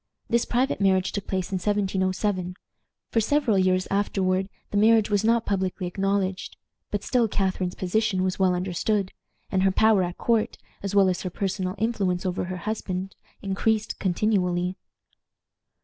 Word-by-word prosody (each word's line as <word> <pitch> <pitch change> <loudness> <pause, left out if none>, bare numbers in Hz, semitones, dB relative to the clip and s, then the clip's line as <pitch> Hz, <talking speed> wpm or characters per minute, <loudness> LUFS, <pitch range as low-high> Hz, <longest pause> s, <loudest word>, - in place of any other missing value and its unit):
This 235 0 +3
private 250 -2 0
marriage 190 -1 +3
took 200 - -5
place 185 -1 -2
in 190 - 0
1707. 190 -1 0 0.6
For 225 - +2
several 235 -3 +2
years 185 0 +2
afterward 195 -1 0 0.2
the 205 - 0
marriage 220 0 +4
was 205 0 +2
not 230 +1 +2
publicly 190 -2 -1
acknowledged; 195 +1 -1 0.3
but 205 0 -3
still 245 -3 +2
Catharine's 190 -3 -1
position 190 0 0
was 185 0 -1
well 185 -1 +3
understood, 190 +2 -1 0.4
and 190 - +2
her 195 - +4
power 215 +1 +4
at 175 0 -3
court, 230 -2 +1 0.2
as 200 0 -3
well 195 -1 +6
as 180 -1 0
her 185 - -3
personal 185 0 -2
influence 195 -4 0
over 180 -1 -1
her 185 +1 -5
husband, 190 -1 -4 0.3
increased 210 +2 0
continually. 180 -2 0
195 Hz, 150 wpm, -25 LUFS, 185-210 Hz, 0.6 s, well